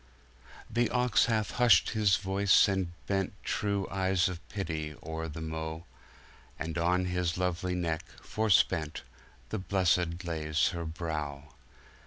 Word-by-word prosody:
The 120 Hz, +1 st, +1 dB
Ox 125 Hz, -3 st, +3 dB
hath 110 Hz, -3 st, 0 dB
hushed 115 Hz, -8 st, +5 dB
his 105 Hz, -4 st, +3 dB
voyce 95 Hz, +2 st, +4 dB
and 95 Hz, -3 st, -1 dB
bentTrewe 100 Hz, 0 st, -1 dB
eyes 95 Hz, -1 st, +2 dB
of 90 Hz, -2 st, -5 dB
Pitty 80 Hz, -6 st, -4 dB
ore 80 Hz, +1 st, -5 dB
the 80 Hz, +1 st, -7 dB
Mow, 80 Hz, +1 st, -5 dB, 0.7 s
And 80 Hz, 0 st, -4 dB
on 90 Hz, +2 st, +2 dB
his 90 Hz, -2 st, 0 dB
lovelie 90 Hz, 0 st, -1 dB
Neck, 80 Hz, -3 st, -1 dB, 0.2 s
forspent, 95 Hz, -7 st, +1 dB, 0.5 s
The 110 Hz, -, -2 dB
Blessed 90 Hz, -2 st, +1 dB
layes 75 Hz, -2 st, +1 dB
her 85 Hz, -2 st, -4 dB
Browe. 75 Hz, -3 st, -5 dB
90 Hz, 125 wpm, -30 LUFS, 80-95 Hz, 0.7 s, hushed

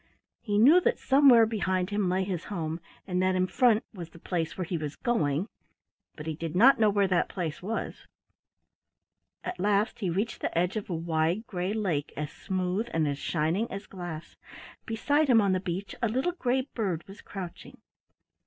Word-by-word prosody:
He 205 Hz, -3 st, -1 dB
knew 290 Hz, +12 st, +7 dB
that 475 Hz, +6 st, +1 dB
somewhere 265 Hz, -4 st, +6 dB
behind 190 Hz, -4 st, -1 dB
him 205 Hz, -3 st, +1 dB
lay 185 Hz, +1 st, +1 dB
his 185 Hz, -3 st, -4 dB
home, 165 Hz, -4 st, -3 dB, 0.3 s
and 180 Hz, -1 st, -1 dB
that 185 Hz, 0 st, +2 dB
in 185 Hz, 0 st, +2 dB
front 235 Hz, +1 st, +3 dB
was 175 Hz, -5 st, -8 dB
the 170 Hz, -, -15 dB
place 165 Hz, -1 st, -3 dB
where 185 Hz, -, -2 dB
he 180 Hz, +1 st, -3 dB
was 155 Hz, -3 st, -4 dB
going, 160 Hz, -6 st, 0 dB, 0.7 s
but 150 Hz, -, -8 dB
he 160 Hz, -, -2 dB
did 160 Hz, +1 st, -5 dB
not 250 Hz, +7 st, +6 dB
know 215 Hz, -1 st, +5 dB
what 200 Hz, -2 st, +1 dB
that 175 Hz, -, +2 dB
place 170 Hz, -5 st, -4 dB
was. 220 Hz, +5 st, -4 dB, 1.4 s
At 360 Hz, 0 st, -5 dB
last 205 Hz, +1 st, +1 dB
he 195 Hz, -5 st, -1 dB
reached 200 Hz, +7 st, -2 dB
the -, -, -2 dB
edge 180 Hz, +3 st, +1 dB
of 215 Hz, -2 st, -4 dB
a 175 Hz, -, -1 dB
wide 165 Hz, +5 st, 0 dB
gray 185 Hz, -1 st, -3 dB
lake 180 Hz, -10 st, -1 dB
as 150 Hz, 0 st, -3 dB
smooth 185 Hz, +4 st, -2 dB
and 160 Hz, -2 st, +2 dB
as 140 Hz, 0 st, -2 dB
shining 170 Hz, +8 st, 0 dB
as 195 Hz, +1 st, -6 dB
glass. 175 Hz, -4 st, -8 dB, 0.5 s
Beside 285 Hz, +7 st, +1 dB
him 245 Hz, -4 st, +6 dB
on 200 Hz, -3 st, +3 dB
the 185 Hz, -, +2 dB
beach 185 Hz, +1 st, -4 dB
a 230 Hz, -, +2 dB
little 260 Hz, +10 st, 0 dB
gray 260 Hz, -7 st, 0 dB
bird 190 Hz, -8 st, -2 dB
was 195 Hz, +1 st, -12 dB
crouching. 185 Hz, -4 st, -8 dB
190 Hz, 190 wpm, -28 LUFS, 170-220 Hz, 1.4 s, knew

